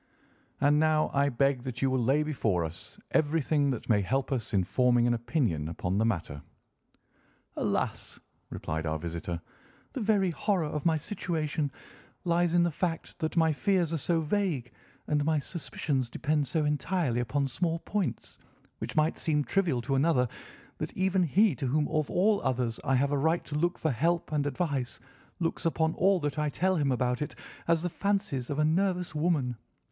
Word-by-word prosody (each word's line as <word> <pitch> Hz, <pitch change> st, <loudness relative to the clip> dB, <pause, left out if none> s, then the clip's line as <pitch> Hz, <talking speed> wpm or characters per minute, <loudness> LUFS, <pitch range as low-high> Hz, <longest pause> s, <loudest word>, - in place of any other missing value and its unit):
And 145 Hz, +1 st, +4 dB
now 155 Hz, 0 st, +2 dB
I 140 Hz, 0 st, +3 dB
beg 135 Hz, 0 st, +1 dB
that 125 Hz, 0 st, -5 dB
you 135 Hz, -, +3 dB
will 130 Hz, -, +2 dB
lay 135 Hz, +6 st, +3 dB
before 110 Hz, -, 0 dB
us 80 Hz, +1 st, -8 dB
everything 150 Hz, -1 st, +2 dB
that 125 Hz, -4 st, -3 dB
may 105 Hz, -4 st, +3 dB
help 135 Hz, +9 st, -1 dB
us 125 Hz, -5 st, -2 dB
in 95 Hz, -2 st, +2 dB
forming 120 Hz, +4 st, +3 dB
an 120 Hz, -, +3 dB
opinion 120 Hz, -, 0 dB
upon 90 Hz, +3 st, -2 dB
the 110 Hz, -, +3 dB
matter." 85 Hz, -9 st, -2 dB, 1.1 s
"Alas!" -, -, -2 dB, 0.3 s
replied 80 Hz, +1 st, -3 dB
our 80 Hz, 0 st, 0 dB
visitor, 85 Hz, +1 st, -4 dB, 0.5 s
"the -, -, -3 dB
very 205 Hz, -4 st, +2 dB
horror 180 Hz, +2 st, 0 dB
of 150 Hz, +2 st, -2 dB
my 160 Hz, -1 st, +3 dB
situation 155 Hz, -4 st, -2 dB, 0.5 s
lies 175 Hz, 0 st, +2 dB
in 175 Hz, -, +5 dB
the 170 Hz, -, +1 dB
fact 165 Hz, +1 st, -3 dB
that 160 Hz, +2 st, -2 dB
my 160 Hz, -1 st, +4 dB
fears 180 Hz, -1 st, +1 dB
are 165 Hz, -, 0 dB
so 165 Hz, +3 st, +1 dB
vague, 160 Hz, -, -1 dB, 0.3 s
and 150 Hz, -1 st, +1 dB
my 155 Hz, +1 st, +2 dB
suspicions 145 Hz, -4 st, -2 dB
depend 150 Hz, +3 st, 0 dB
so 155 Hz, +3 st, 0 dB
entirely 150 Hz, -3 st, 0 dB
upon 135 Hz, +4 st, 0 dB
small 165 Hz, +5 st, -1 dB
points, 200 Hz, +2 st, -3 dB, 0.4 s
which -, -, -5 dB
might 155 Hz, +1 st, +2 dB
seem 150 Hz, -2 st, +1 dB
trivial 160 Hz, -9 st, 0 dB
to 135 Hz, -, -1 dB
another, 135 Hz, -2 st, +3 dB, 0.5 s
that -, -, -5 dB
even 190 Hz, 0 st, +2 dB
he 185 Hz, +4 st, +4 dB
to 130 Hz, +1 st, -3 dB
whom 150 Hz, +3 st, +1 dB
of 155 Hz, -2 st, 0 dB
all 205 Hz, +3 st, +3 dB
others 120 Hz, -3 st, -1 dB
I 135 Hz, -, +2 dB
have 140 Hz, +2 st, +2 dB
a 145 Hz, -, +1 dB
right 160 Hz, +4 st, +1 dB
to 145 Hz, -, -5 dB
look 175 Hz, +4 st, +1 dB
for 155 Hz, -, 0 dB
help 165 Hz, +8 st, 0 dB
and 145 Hz, -1 st, +1 dB
advice 140 Hz, -3 st, -2 dB, 0.4 s
looks 165 Hz, -2 st, -1 dB
upon 160 Hz, -1 st, +1 dB
all 195 Hz, 0 st, +3 dB
that 145 Hz, +1 st, -2 dB
I 150 Hz, 0 st, +1 dB
tell 185 Hz, +5 st, +1 dB
him 140 Hz, -3 st, +1 dB
about 125 Hz, 0 st, 0 dB
it 150 Hz, -, -3 dB, 0.3 s
as 165 Hz, 0 st, +2 dB
the 180 Hz, -, 0 dB
fancies 195 Hz, -, -1 dB
of 145 Hz, -, -2 dB
a 150 Hz, -, +3 dB
nervous 180 Hz, +2 st, +1 dB
woman. 150 Hz, -6 st, +1 dB
150 Hz, 185 wpm, -29 LUFS, 125-170 Hz, 1.1 s, in